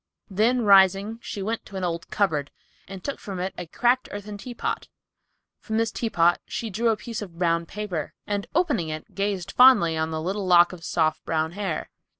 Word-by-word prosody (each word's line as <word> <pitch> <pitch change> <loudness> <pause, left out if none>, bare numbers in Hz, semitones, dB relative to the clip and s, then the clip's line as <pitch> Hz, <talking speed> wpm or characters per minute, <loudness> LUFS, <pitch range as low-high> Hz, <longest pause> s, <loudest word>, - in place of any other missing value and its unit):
Then 230 +5 +2
rising 195 +2 +5
she 205 -4 -5
went 225 +3 -2
to 200 - -12
an 190 - -3
old 170 0 -3
cupboard, 155 -9 0 0.4
and 195 -1 -9
took 280 - -4
from 195 -3 -6
it 185 +2 -3
a 180 - -7
cracked 245 +8 +1
earthen 205 0 -6
teapot. 240 +2 -4 0.7
From 220 -1 -3
this 225 0 +1
teapot 175 -7 +2
she 225 -3 -4
drew 230 +5 +1
a 220 - +1
piece 230 -1 -6
of 180 -5 -9
brown 170 -1 +1
paper, 200 -6 -5
and 205 -1 -2
opening 295 - +1
it 155 0 -7
gazed 195 -3 -2
fondly 240 -11 +6
on 160 0 -1
a 160 - -2
little 190 +4 -3
lock 175 0 +6
of 170 -2 -11
soft 160 -2 0
brown 160 0 -1
hair. 195 -3 -4
195 Hz, 190 wpm, -25 LUFS, 170-220 Hz, 0.7 s, fondly